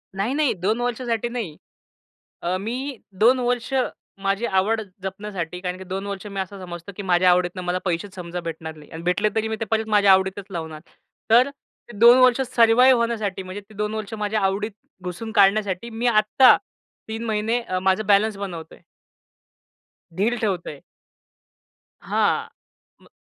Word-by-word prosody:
नाही, 200 Hz, +7 st, -1 dB
नाही. 295 Hz, -2 st, +2 dB
2 205 Hz, +4 st, -1 dB
वर्षासाठी 240 Hz, -1 st, -1 dB
नाही. 225 Hz, -11 st, -5 dB, 0.9 s
अ, 175 Hz, +2 st, 0 dB
मी 255 Hz, +6 st, -4 dB, 0.2 s
2 245 Hz, +4 st, +6 dB
वर्ष, 245 Hz, +1 st, -1 dB, 0.5 s
माझी 195 Hz, +3 st, 0 dB
आवड 210 Hz, +3 st, +1 dB, 0.2 s
जपण्यासाठी. 190 Hz, -3 st, -5 dB
कारण 180 Hz, 0 st, -4 dB
की 190 Hz, -, -9 dB
2 190 Hz, +2 st, -5 dB
वर्ष 200 Hz, 0 st, -5 dB
मी 200 Hz, -1 st, -4 dB
असं 190 Hz, +1 st, -6 dB
समजतो, 175 Hz, +2 st, -8 dB
की 205 Hz, -, -5 dB
माझ्या 180 Hz, -1 st, +4 dB
आवडीतनं 180 Hz, +1 st, +1 dB
मला 180 Hz, +1 st, 0 dB
पैसेच 185 Hz, +2 st, -2 dB
समजा 180 Hz, -1 st, -5 dB
भेटणार 160 Hz, -1 st, -6 dB
नाही. 150 Hz, -1 st, -15 dB
आणि 160 Hz, -, -8 dB
भेटले 180 Hz, +5 st, +1 dB
तरी 220 Hz, 0 st, +1 dB
मी 220 Hz, -, -2 dB
ते -, -, 0 dB
परत 220 Hz, 0 st, +1 dB
माझ्या 205 Hz, -2 st, +5 dB
आवडीतच 190 Hz, +1 st, +1 dB
लावणार. 160 Hz, -4 st, -6 dB, 0.5 s
तर 245 Hz, +4 st, +6 dB
ते 260 Hz, -4 st, -18 dB
2 235 Hz, +3 st, +8 dB
वर्ष 255 Hz, 0 st, +5 dB
सर्वाइव 245 Hz, +3 st, +6 dB
होण्यासाठी. 220 Hz, -5 st, -1 dB
म्हणजे 185 Hz, +2 st, -7 dB
ते 205 Hz, +1 st, -19 dB
2 210 Hz, +1 st, -2 dB
वर्ष 215 Hz, 0 st, -5 dB
माझ्या 210 Hz, 0 st, -1 dB
आवडीत 195 Hz, +3 st, 0 dB, 0.3 s
घुसून 180 Hz, +5 st, -6 dB
काढण्यासाठी, 200 Hz, 0 st, +2 dB
मी 230 Hz, +2 st, -2 dB
आत्ता 230 Hz, +3 st, +6 dB, 0.5 s
3 225 Hz, +1 st, -4 dB
महिने 220 Hz, +2 st, 0 dB
अ, 185 Hz, -6 st, -3 dB
माझं 190 Hz, +2 st, +1 dB
बॅलन्स 205 Hz, +1 st, +3 dB
बनवतोय. 175 Hz, -5 st, -7 dB, 1.4 s
ढील 220 Hz, +5 st, +2 dB
ठेवतोय. 180 Hz, -9 st, -3 dB, 1.2 s
हां, -, -, +1 dB, 0.5 s
म -, -, -21 dB
205 Hz, 160 wpm, -23 LUFS, 185-225 Hz, 1.4 s, 2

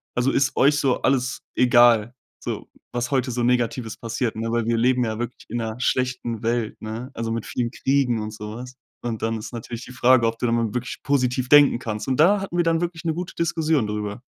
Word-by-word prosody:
also, 125 Hz, +2 st, +2 dB
ist 135 Hz, -1 st, +1 dB
euch 145 Hz, +3 st, +4 dB
so 130 Hz, -2 st, +1 dB
alles 130 Hz, -1 st, 0 dB
egal, 120 Hz, -2 st, +5 dB, 0.3 s
so, -, -, -5 dB, 0.3 s
was 120 Hz, 0 st, -2 dB
heute 130 Hz, -2 st, 0 dB
so 120 Hz, +1 st, -2 dB
Negatives 120 Hz, -1 st, 0 dB
passiert, 115 Hz, 0 st, -2 dB
ne?“ 115 Hz, +1 st, -3 dB
Weil 115 Hz, -1 st, 0 dB
wir 115 Hz, -1 st, +2 dB
leben 125 Hz, +1 st, +3 dB
ja 110 Hz, -1 st, -3 dB
wirklich 120 Hz, +1 st, -6 dB
in' 120 Hz, -, -3 dB
ner 110 Hz, -1 st, -3 dB
schlechten 125 Hz, -3 st, -1 dB
Welt, 115 Hz, -1 st, -1 dB
ne? 115 Hz, +4 st, -5 dB
Also, 115 Hz, 0 st, -3 dB
mit 115 Hz, -1 st, -3 dB
vielen 120 Hz, -1 st, -2 dB
Kriegen 130 Hz, -6 st, +1 dB
und 105 Hz, 0 st, -5 dB
so 105 Hz, 0 st, -7 dB
was. 125 Hz, +1 st, -9 dB, 0.3 s
Und 115 Hz, -2 st, -4 dB
dann 115 Hz, 0 st, 0 dB
ist 110 Hz, -, -8 dB
natürlich 115 Hz, +1 st, -6 dB
die -, -, -11 dB
Frage, 120 Hz, -1 st, +4 dB
ob 115 Hz, 0 st, -2 dB
du 125 Hz, -, -1 dB
da 115 Hz, -, +1 dB
mal 115 Hz, -2 st, +1 dB
wirklich 125 Hz, 0 st, -4 dB
positiv 130 Hz, -2 st, 0 dB
denken 145 Hz, -4 st, +6 dB
kannst. 110 Hz, -2 st, -5 dB
Und 130 Hz, -, 0 dB
da 195 Hz, +6 st, +5 dB
hatten 190 Hz, -3 st, -5 dB
wir 175 Hz, -, +3 dB
dann 165 Hz, -1 st, +2 dB
wirklich 175 Hz, -1 st, -3 dB
'ne 160 Hz, -, +1 dB
gute 180 Hz, +1 st, -5 dB
Diskussion 160 Hz, -7 st, +1 dB
drüber. 105 Hz, +2 st, -4 dB
120 Hz, 225 wpm, -23 LUFS, 115-130 Hz, 0.3 s, denken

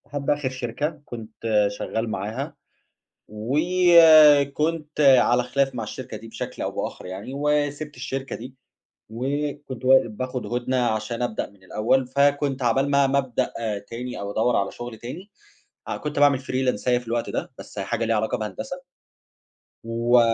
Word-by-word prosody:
لحد 145 Hz, -1 st, -4 dB
آخر 145 Hz, -2 st, +1 dB
شركة 130 Hz, +5 st, -4 dB
كنت 110 Hz, -2 st, -1 dB
شغال 110 Hz, +2 st, -3 dB
معاها، 110 Hz, +10 st, -4 dB, 0.7 s
وكنت 155 Hz, -, +5 dB
على 125 Hz, -3 st, +5 dB
خلاف 135 Hz, +1 st, 0 dB
مع 120 Hz, -, -3 dB
الشركة 130 Hz, -, -7 dB
دي 115 Hz, -, -11 dB
بشكل 115 Hz, -, -6 dB
أو -, -, -2 dB
بآخر -, -, -5 dB
يعني، 95 Hz, +6 st, -7 dB
وسِبت 145 Hz, +1 st, -1 dB
الشركة 135 Hz, +1 st, -4 dB
دي، 125 Hz, +3 st, -9 dB, 0.5 s
وكنت 135 Hz, +2 st, -4 dB
و 130 Hz, +1 st, +8 dB
باخد 125 Hz, +3 st, -5 dB
هُدنة 125 Hz, +1 st, 0 dB
عشان 115 Hz, +1 st, -2 dB
ابدأ 120 Hz, -3 st, -2 dB
من 100 Hz, -2 st, -23 dB
الأول، 120 Hz, +7 st, +1 dB
فكنت 140 Hz, 0 st, +1 dB
عقبال 135 Hz, +4 st, +2 dB
ما 140 Hz, -1 st, +4 dB
ما 135 Hz, +1 st, +1 dB
ابدأ 130 Hz, -4 st, -1 dB, 0.4 s
تاني 125 Hz, +2 st, -6 dB
أو 100 Hz, 0 st, -4 dB
أدوّر 115 Hz, +4 st, +1 dB
على 100 Hz, 0 st, 0 dB
شغل 120 Hz, -2 st, -8 dB
تاني، 165 Hz, -, -9 dB, 0.6 s
آه -, -, -3 dB
كنت 150 Hz, -1 st, -4 dB
باعمل 145 Hz, -2 st, +5 dB
فريلانساية 130 Hz, -2 st, 0 dB
في 120 Hz, -, -15 dB
الوقت 115 Hz, 0 st, -1 dB
ده، -, -, -3 dB
بس -, -, -11 dB
أهي -, -, -2 dB
حاجة 115 Hz, -, -1 dB
ليها 115 Hz, 0 st, +1 dB
علاقة 110 Hz, +3 st, 0 dB
بهندسة، 110 Hz, -, -5 dB, 1.0 s
و 115 Hz, +2 st, +3 dB
130 Hz, 155 wpm, -24 LUFS, 115-145 Hz, 1.0 s, و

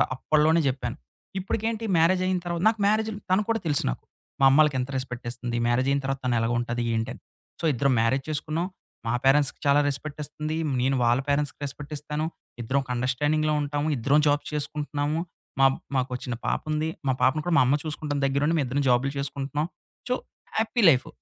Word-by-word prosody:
అప్పట్లోనే 155 Hz, +4 st, +3 dB
చెప్పాను. 125 Hz, 0 st, -4 dB, 0.4 s
ఇప్పుటికేంటి 225 Hz, +4 st, -2 dB
మ్యారేజ్ 180 Hz, +3 st, +4 dB
అయిన 185 Hz, 0 st, +1 dB
తర్వా 170 Hz, -1 st, -3 dB
నాకు 220 Hz, 0 st, +2 dB
మ్యారేజులు 215 Hz, 0 st, +1 dB
తను 190 Hz, +3 st, +4 dB
కూడా 225 Hz, 0 st, +2 dB
తెలుసు 145 Hz, -3 st, +3 dB
నాకు. -, -, -4 dB, 0.4 s
మా 135 Hz, -, +7 dB
అమ్మలకి 150 Hz, 0 st, +5 dB
ఎంత 125 Hz, +1 st, -2 dB
రెస్పెక్ట్ 130 Hz, -1 st, -5 dB
ఇస్తుంది, 120 Hz, 0 st, -4 dB
మ్యారేజ్ 130 Hz, +3 st, +2 dB
అయిన 140 Hz, 0 st, +1 dB
తర్వాత 135 Hz, -2 st, -1 dB
ఎలాగుంటది? 120 Hz, +1 st, -1 dB
ఏంటని? 115 Hz, 0 st, -3 dB, 0.4 s
సో, -, -, -1 dB
ఇద్దరం 140 Hz, +2 st, +2 dB
మ్యారేజ్ 130 Hz, +4 st, +1 dB
చేసుకున్నాం. 155 Hz, +3 st, -1 dB, 0.4 s
మా 115 Hz, -, +1 dB
పేరెంట్స్‌కి 140 Hz, +1 st, +3 dB
చాలా 140 Hz, +1 st, +5 dB
రెస్పెక్టిస్తుంది, 150 Hz, +2 st, -4 dB, 0.2 s
నేను 135 Hz, +2 st, +2 dB
వాళ్ళ 120 Hz, +1 st, +3 dB
పేరెంట్స్‌కి 145 Hz, 0 st, 0 dB
రెస్పెక్టిస్తాను. 150 Hz, +2 st, -4 dB, 0.4 s
ఇద్దరం 130 Hz, +5 st, +1 dB
ఒక 125 Hz, -, -20 dB
అండర్‌స్టాండింగ్‌లో 150 Hz, +5 st, +1 dB
ఉంటాము. 145 Hz, +1 st, -2 dB
ఇద్దరం 140 Hz, +6 st, +3 dB
జాబ్స్ 145 Hz, 0 st, 0 dB
చేసుకుంటున్నాము. 150 Hz, +1 st, -2 dB, 0.4 s
మా 135 Hz, -, +7 dB, 0.3 s
మాకో 130 Hz, -1 st, 0 dB
చిన్న 120 Hz, -1 st, -3 dB
పాపుంది. 155 Hz, +1 st, -1 dB, 0.2 s
మా 130 Hz, -, +3 dB
పాపను 140 Hz, +4 st, +3 dB
కూడా 175 Hz, -, 0 dB
మా -, -, +7 dB
అమ్మ 135 Hz, +3 st, +3 dB
చూసుకుంటాం 150 Hz, -1 st, -3 dB
దగ్గర 135 Hz, +1 st, +1 dB
ఉండి. 165 Hz, -, +2 dB
మేమిద్దరం 140 Hz, 0 st, 0 dB
జాబులు 125 Hz, +2 st, +3 dB
చేసుకుంటున్నాం. 140 Hz, +1 st, -2 dB, 0.4 s
So, 250 Hz, -, +1 dB, 0.4 s
happy 225 Hz, +2 st, +1 dB
life. 130 Hz, -5 st, +3 dB
145 Hz, 165 wpm, -26 LUFS, 130-155 Hz, 0.4 s, మా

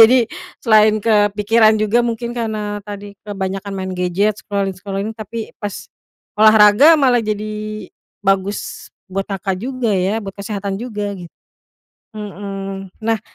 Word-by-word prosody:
jadi 240 Hz, 0 st, +4 dB, 0.3 s
selain 215 Hz, -2 st, +5 dB
kepikiran 215 Hz, +1 st, +4 dB
juga 215 Hz, +2 st, +2 dB
mungkin 235 Hz, 0 st, -2 dB
karena 215 Hz, -3 st, -2 dB
tadi 205 Hz, 0 st, -8 dB
kebanyakan 195 Hz, 0 st, -4 dB
main 190 Hz, -1 st, -4 dB
gadget, 190 Hz, +4 st, +1 dB
scrolling-scrolling, 195 Hz, 0 st, -3 dB
tapi 220 Hz, +1 st, -6 dB
pas 205 Hz, -1 st, -4 dB, 0.6 s
olahraga 215 Hz, +7 st, +7 dB
malah 265 Hz, -5 st, +4 dB
jadi 215 Hz, -1 st, -4 dB, 0.3 s
bagus 195 Hz, 0 st, -1 dB, 0.2 s
buat 195 Hz, +1 st, -2 dB
Kakak 195 Hz, -1 st, -3 dB
juga 250 Hz, +1 st, -2 dB
ya, 195 Hz, +3 st, +1 dB
buat 195 Hz, -1 st, -6 dB
kesehatan 200 Hz, -1 st, -4 dB
juga 210 Hz, -3 st, -4 dB
git 175 Hz, -2 st, -10 dB, 0.8 s
mhm, 195 Hz, -1 st, -6 dB
nah, 225 Hz, -1 st, 0 dB
205 Hz, 120 wpm, -18 LUFS, 195-220 Hz, 0.8 s, olahraga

